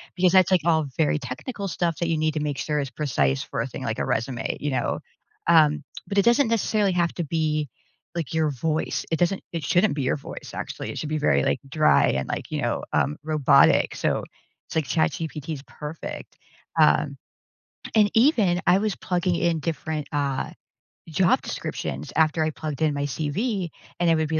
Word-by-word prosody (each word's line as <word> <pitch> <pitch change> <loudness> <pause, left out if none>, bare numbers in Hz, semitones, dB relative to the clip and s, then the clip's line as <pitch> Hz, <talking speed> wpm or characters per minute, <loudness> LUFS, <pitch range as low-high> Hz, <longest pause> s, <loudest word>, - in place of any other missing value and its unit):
Because 180 0 +4
that's, 185 -1 +5
like, 185 -3 +4
all 160 -2 +3
very 155 -1 +2
technical 195 - -5
stuff 170 -2 -1
that 170 - 0
you 165 - +1
need 155 0 +1
to - - 0
make 145 -2 -2
sure 150 +1 -1
is 140 -2 -2
precise 70 - 0
for - - -3
a - - -2
thing, - - -7
like, - - -2
a - - 0
resume, 120 +1 -2
you 145 - -2
know, 130 -2 -1 0.5
um, 155 -3 +5 0.2
but, 200 - -3
it 200 - +6
doesn't 240 +3 +5
necessarily 215 -3 +2
have 170 -1 +1
to 175 - -2
be, 155 -2 -1 0.5
like, 165 -4 -3
your 160 -1 +2
voice, 155 +4 -1
it 160 - +2
doesn't, 180 +2 +1
it 165 -2 -3
shouldn't 180 +5 +2
be 145 - -1
your 130 - +1
voice, 140 - -9
actually, - - -5
it - - -8
should 150 - -4
be 155 - 0
very, 150 - +3
like, - - +1
dry 155 - +4
and, 65 0 -1
like, - - -4
you - - -1
know, - - -1
um, 75 - +1
robotic, 155 -3 +4
so - - 0 0.4
it's - - -9
like 160 -2 +1
ChatGPT 160 +1 -1
is 140 -3 -7
perfect. 150 +2 -8 0.4
Um, - - +4 0.8
and 210 -2 +5
even 225 - +4
I 185 - +6
was 210 0 -1
plugging 180 -1 0
in 170 -1 +1
different, 155 -1 -3
uh, 140 -2 -1 0.6
job 175 +3 +3
descriptions 70 +2 -5
after 160 0 +3
I 155 - 0
plugged 155 -2 -5
in 155 -2 +3
my 140 0 -2
CV, 175 - -2 0.3
and 175 -1 +3
it 165 - +5
would 160 -1 0
be 160 0 +1
160 Hz, 200 wpm, -25 LUFS, 145-175 Hz, 0.8 s, it